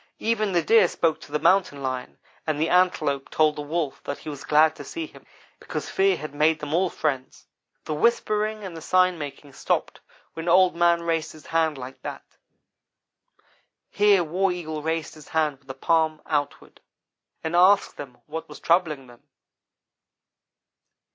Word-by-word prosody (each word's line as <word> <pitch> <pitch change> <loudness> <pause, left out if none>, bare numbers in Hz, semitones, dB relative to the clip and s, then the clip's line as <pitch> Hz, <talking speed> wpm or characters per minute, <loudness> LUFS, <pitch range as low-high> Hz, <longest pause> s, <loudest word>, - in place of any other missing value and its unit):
Even 215 -2 0
the 175 -2 +2
Deer 220 0 +5
spoke 165 -2 0
to - - -13
the 150 - +1
Mountain 180 -5 +2
lion, 130 -1 -4 0.3
and 155 -2 0
the 160 +2 +1
Antelope 180 -7 +2
told 155 -1 +2
the 150 - -5
Wolf 150 -1 -3
that 140 - -4
he - - -9
was 145 -2 -7
glad 155 +1 +4
to - - -9
see 330 -1 -5
him, 315 - -16 0.3
because - - -5
fear 195 -1 +3
had 155 -2 -7
made 155 +2 +2
them 150 0 -5
all 180 +2 +2
friends. 135 -6 -3 0.4
"The 155 - -3
whispering 215 +2 +1
and 185 -4 -7
the 165 - -8
sign 185 0 +2
making 145 -1 -8
stopped - - -2 0.3
when 165 +1 -4
Old 185 +1 +5
man 170 0 +3
raised 165 -1 -1
his 155 -2 -15
hand 160 -2 0
like 130 +1 -9
that" - - -7 1.7
(here 205 -3 +4
War 180 +4 0
Eagle 160 -3 -5
raised 160 0 -2
his 155 -2 -14
hand 155 -4 0
with 135 - -31
the 135 - -7
palm 160 +1 +1
outward) 145 -2 -3 0.6
"and 160 +1 -2
asked 185 +3 +4
them 130 -4 -9
what 160 +2 -7
was - - -10
troubling 160 -6 +1
them. 120 -1 -17
160 Hz, 170 wpm, -25 LUFS, 150-180 Hz, 1.7 s, Deer